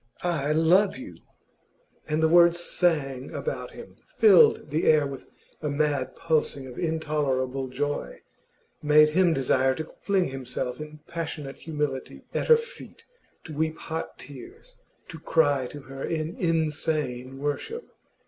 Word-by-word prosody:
'I 155 -4 0
love 180 +6 +3
you!' 265 +2 -9 1.0
And 155 +1 +1
the - - +6
words 170 +1 +6
sang 145 -7 0
about 485 - -4
him, - - -12 0.2
filled 440 - +6
the 155 +2 0
air 155 -2 +5
with 135 -2 -7 0.3
a 150 - -2
mad 145 -3 -1
pulsing 155 -4 -1
of 125 -2 -9
intolerable 145 -5 -1
joy, 145 +3 -3 0.6
made 150 0 +6
him 175 +2 +3
desire 130 -2 +2
to 160 - -4
fling 190 +2 -1
himself 130 -1 -4
in 150 0 -9
passionate 155 -4 -5
humility 150 -4 -4
at - - -1
her 470 -1 +8
feet, 465 +2 -10 0.4
to 160 - -9
weep 160 +1 -1
hot 160 0 -5
tears, 145 - -12 0.3
to 165 -2 -9
cry 145 -5 +2
to 145 +3 -9
her 135 0 -9
in 160 +2 -3
insane 155 - -1
worship. 145 - -3
155 Hz, 140 wpm, -26 LUFS, 135-165 Hz, 1.0 s, her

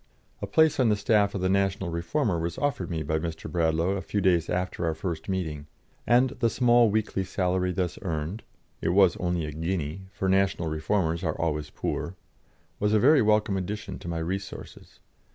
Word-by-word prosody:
A - - -3
place 160 -2 +3
on 125 -3 +4
the 105 - +3
staff 105 -1 +2
of 95 - -2
the 95 - +1
National 95 -1 0
Reformer 85 - -1
was 85 0 -3
offered 135 -11 -1
me 80 -2 -2
by 80 +2 -1
Mr. 80 0 -5
Bradlaugh 80 +2 +1
a 95 - -3
few 105 - -2
days 90 -4 +2
after 90 0 -2
our 80 -1 0
first 85 0 -5
meeting, 80 -6 -3 0.4
and 125 +1 +4
the 115 -1 +3
small 120 -1 +4
weekly 105 -2 0
salary 90 0 0
thus 90 -1 -2
earned 85 +3 -3 0.4
it - - 0
was 95 0 +5
only 90 -2 -1
a 75 - -5
guinea, 80 +2 -3
for 95 - -3
national 95 -3 +1
reformers 80 +2 -1
are 80 -2 -2
always 75 -2 -1
poor 90 - -4 0.6
was 105 +1 +1
a 110 - +5
very 140 +4 +6
welcome 105 -1 +2
addition 100 +2 -4
to - - -10
my 85 -1 -2
resources. 95 +4 -6
95 Hz, 190 wpm, -27 LUFS, 85-105 Hz, 0.6 s, very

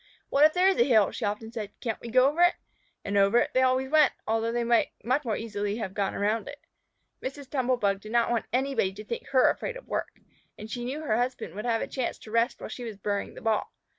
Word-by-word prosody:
"What 280 - +4
if 310 - +4
there 365 +1 +4
is 385 - +3
a - - +7
hill?" 220 -6 +4
she - - -4
often 210 +2 -3
said. 215 -3 -7
"Can't 225 -4 -3
we 235 - -7
go 255 +3 +5
over 300 +5 0
it?" 350 0 +5 0.5
And 200 0 0
over 200 +3 +4
it - - +2
they 260 - +3
always 260 +1 +2
went, 310 -1 +5
although 225 +1 0
they 240 0 0
might 235 0 +3 0.2
much 255 +5 +1
more 225 -4 -1
easily 205 -2 -3
have 195 -5 -4
gone 200 -1 -1
around 210 +2 0
it. 290 0 -9 0.6
Mrs. 275 +1 -6
Tumble 255 -2 +1
bug 200 -3 0
did 215 - -9
not 235 0 +2
want 235 -2 -1
anybody 260 -7 0
to 210 +2 -10
think 235 - -5
her 260 -2 +4
afraid - - -5
of - - -14
work, - - -4 0.4
and 215 +1 -9
she 240 +1 -4
knew 275 +5 -4
her 220 -7 +1
husband 245 -8 -2
would 210 +4 -6
have 230 -2 +1
a - - -4
chance 255 -3 -3
to 215 - -13
rest 230 +2 +1
while - - -6
she 250 - -7
was 225 -4 -6
burying 200 0 -3
the - - -10
ball. 220 -2 0
235 Hz, 255 wpm, -27 LUFS, 215-260 Hz, 0.6 s, a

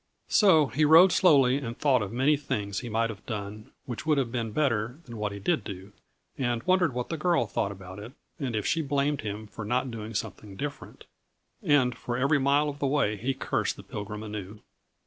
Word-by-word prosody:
So 185 -8 +5
he 135 +4 0
rode 165 +5 +8
slowly 140 -9 +5
and 120 -4 -5
thought 135 -5 +3
of 105 - -4
many 135 +6 +3
things 100 -8 -3
he 120 - -6
might 115 +1 0
have 100 -2 -12
done 105 -1 -6 0.2
which 120 -3 -5
would 155 -1 +2
have 130 -4 0
been 115 -3 -2
better 120 -2 0
than 120 - -9
what 105 -1 -2
he 100 - -6
did 155 - 0
do; 95 0 -8 0.5
and 120 -3 -1
wondered 180 -7 +2
what 125 -1 -3
the 165 - -2
girl 170 -5 +2
thought 100 -1 -2
about 95 0 -10
it 110 +5 -9 0.3
and 130 -6 -2
if 105 - -1
she 165 - +1
blamed 140 0 0
him 105 0 -5
for 105 +1 -8
not 125 +4 -1
doing 110 -1 -7
something 100 0 -5
different. 145 +7 -7 0.6
And 145 - +3
for 120 0 -4
every 140 +3 +3
mile 140 +2 +3
of 145 -1 -5
the 140 - 0
way 135 -7 +1
he 125 +6 -2
cursed - - -1
the - - -12
Pilgrim 105 0 -6
anew. 105 -1 -7
125 Hz, 210 wpm, -27 LUFS, 105-145 Hz, 0.6 s, rode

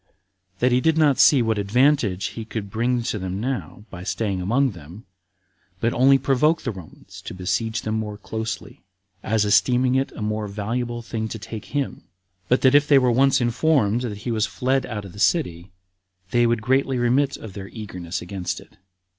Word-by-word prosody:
That 125 +5 +2
he 125 +1 +3
did 160 +1 +2
not 150 -4 +3
see 135 -5 +6
what 110 -2 0
advantage 110 -2 +2
he 115 - -7
could 110 -3 -6
bring 120 +2 0
to 115 -3 -2
them 95 +1 -4
now, 120 -3 -4
by 90 - -8
staying 100 -2 -2
among 125 +8 +2
them, 85 +4 -12 0.7
but 115 +3 0
only 135 +2 +5
provoke 140 +5 +2
the 125 - -2
Romans 90 -6 -12
to - - -8
besiege 110 +5 -2
them 110 0 -1
more 105 -1 -5
closely, 110 +5 -6 0.4
as 110 -1 +1
esteeming 125 +4 +3
it 135 +1 0
a - - -8
most 105 -1 -3
valuable 120 +3 -3
thing 110 -1 -3
to 110 - -6
take 110 +1 -8
him; 145 -2 -3 0.4
but 125 - +2
that 130 0 +5
if 145 0 +5
they 145 - +6
were 125 -2 +4
once 135 +3 +4
informed 120 -2 +2
that 110 -5 -4
he 120 - -1
was 110 -1 +1
fled 130 +7 0
out 105 -4 -5
of 95 - -10
the 100 - -11
city, 90 -2 0 0.6
they 120 -1 +3
would 115 -1 0
greatly 130 +1 +1
remit 130 +3 +1
of 110 -4 -10
their 95 0 -7
eagerness 90 -5 -6
against 90 0 -4
it. - - -18
115 Hz, 190 wpm, -23 LUFS, 100-130 Hz, 0.7 s, see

